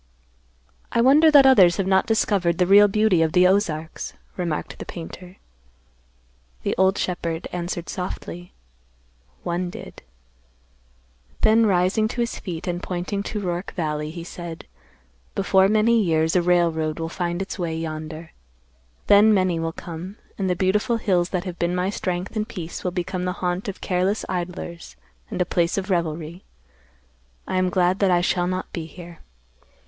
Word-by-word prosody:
"I 235 Hz, -, +1 dB
wonder 290 Hz, +6 st, +6 dB
that 285 Hz, -3 st, +7 dB
others 195 Hz, -10 st, +6 dB
have 195 Hz, -, 0 dB
not 190 Hz, 0 st, +2 dB
discovered 195 Hz, -6 st, +1 dB
the 180 Hz, -, +3 dB
real 200 Hz, +3 st, +7 dB
beauty 205 Hz, -4 st, +2 dB
of 160 Hz, -1 st, +1 dB
the 180 Hz, 0 st, +5 dB
Ozarks," 170 Hz, -5 st, 0 dB, 0.2 s
remarked 170 Hz, -4 st, -3 dB
the -, -, -5 dB
painter. 180 Hz, +2 st, -9 dB, 1.3 s
The -, -, 0 dB
old 190 Hz, +2 st, +3 dB
shepherd 170 Hz, -2 st, -3 dB
answered 175 Hz, -1 st, -4 dB
softly, 180 Hz, -1 st, -6 dB, 0.9 s
"One 175 Hz, +1 st, -2 dB
did." -, -, -10 dB, 1.4 s
Then 220 Hz, +1 st, +5 dB
rising 190 Hz, +3 st, +2 dB
to 240 Hz, -, -3 dB
his 235 Hz, -, -2 dB
feet 170 Hz, -4 st, -6 dB
and 175 Hz, 0 st, -3 dB
pointing 185 Hz, +3 st, -3 dB
to 210 Hz, +1 st, -4 dB
Roark 175 Hz, 0 st, -3 dB
valley, 150 Hz, -4 st, -2 dB
he 165 Hz, +1 st, -7 dB
said, 170 Hz, -1 st, -8 dB, 0.7 s
"Before 190 Hz, -1 st, +4 dB
many 220 Hz, +2 st, +3 dB
years 160 Hz, -3 st, +1 dB
a 180 Hz, -, +4 dB
railroad 165 Hz, -3 st, +1 dB
will 165 Hz, -, -2 dB
find 175 Hz, +1 st, -3 dB
its 195 Hz, 0 st, -5 dB
way 165 Hz, -2 st, -2 dB
yonder. 160 Hz, 0 st, -6 dB, 0.7 s
Then 205 Hz, +2 st, +6 dB
many 185 Hz, -4 st, +2 dB
will 165 Hz, 0 st, -2 dB
come, 175 Hz, +5 st, -8 dB, 0.2 s
and 190 Hz, -2 st, -2 dB
the 180 Hz, -, +1 dB
beautiful 205 Hz, +6 st, +1 dB
hills 185 Hz, -6 st, +1 dB
that 180 Hz, -2 st, -2 dB
have 180 Hz, -2 st, -7 dB
been 175 Hz, +1 st, 0 dB
my 180 Hz, +2 st, 0 dB
strength 185 Hz, 0 st, -3 dB
and 215 Hz, 0 st, -1 dB
peace 175 Hz, -4 st, -7 dB
will 180 Hz, -, 0 dB
become 180 Hz, 0 st, -3 dB
the 180 Hz, -, -1 dB
haunt 180 Hz, +2 st, -2 dB
of 200 Hz, -, -6 dB
careless 185 Hz, +3 st, 0 dB
idlers 175 Hz, -1 st, -5 dB, 0.3 s
and 190 Hz, -, -5 dB
a 180 Hz, -, +2 dB
place 170 Hz, 0 st, 0 dB
of 195 Hz, 0 st, -2 dB
revelry. 170 Hz, 0 st, -2 dB, 1.0 s
I 185 Hz, -, -1 dB
am 185 Hz, 0 st, +2 dB
glad 180 Hz, +1 st, +1 dB
that 195 Hz, -, +3 dB
I 175 Hz, -1 st, +3 dB
shall 175 Hz, 0 st, +1 dB
not 185 Hz, 0 st, -4 dB
be 165 Hz, -2 st, -4 dB
here. 170 Hz, -1 st, -12 dB
180 Hz, 165 wpm, -23 LUFS, 170-195 Hz, 1.4 s, that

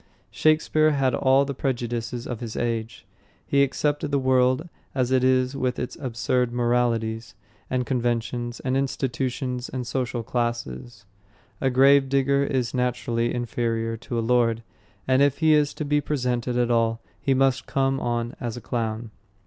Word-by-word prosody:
Shakespeare 155 Hz, +3 st, +3 dB
had 135 Hz, -3 st, +1 dB
all 135 Hz, +2 st, +3 dB
the 140 Hz, -, -3 dB
prejudices 120 Hz, -2 st, -3 dB
of 120 Hz, -3 st, -5 dB
his 115 Hz, -2 st, -6 dB
age. 115 Hz, -2 st, -3 dB, 0.4 s
He 140 Hz, -, +2 dB
accepted 145 Hz, +2 st, 0 dB
the 140 Hz, -, +1 dB
world 130 Hz, +3 st, +2 dB, 0.3 s
as 130 Hz, -2 st, 0 dB
it 130 Hz, -1 st, +3 dB
is 130 Hz, 0 st, +2 dB
with 130 Hz, -2 st, -1 dB
its 125 Hz, -, -4 dB
absurd 125 Hz, -1 st, 0 dB
moralities, 115 Hz, -3 st, 0 dB, 0.3 s
its 130 Hz, -1 st, 0 dB
conventions 120 Hz, -1 st, -2 dB
and 130 Hz, 0 st, -1 dB
institutions 130 Hz, -2 st, -2 dB
and 130 Hz, -1 st, -4 dB
social 125 Hz, -2 st, -2 dB
classes. 120 Hz, -, -3 dB, 0.6 s
A 135 Hz, -, +2 dB
gravedigger 140 Hz, +1 st, +4 dB
is 130 Hz, -4 st, -1 dB
naturally 125 Hz, -2 st, 0 dB
inferior 115 Hz, -1 st, -2 dB
to 120 Hz, +1 st, -5 dB
a 115 Hz, -, 0 dB
lord, 115 Hz, -1 st, +2 dB, 0.4 s
and 130 Hz, +1 st, +4 dB
if 140 Hz, -1 st, +3 dB
he 160 Hz, -1 st, +4 dB
is 150 Hz, -1 st, +3 dB
to 150 Hz, -, -4 dB
be 150 Hz, 0 st, +2 dB
presented 125 Hz, -4 st, -1 dB
at 120 Hz, -1 st, +1 dB
all, 115 Hz, -1 st, +2 dB, 0.2 s
he 135 Hz, -, +2 dB
must 135 Hz, -2 st, +2 dB
come 135 Hz, 0 st, +1 dB
on 120 Hz, -1 st, -2 dB
as 120 Hz, -1 st, -4 dB
a -, -, -7 dB
clown. 115 Hz, -1 st, -3 dB
125 Hz, 155 wpm, -24 LUFS, 120-135 Hz, 0.6 s, gravedigger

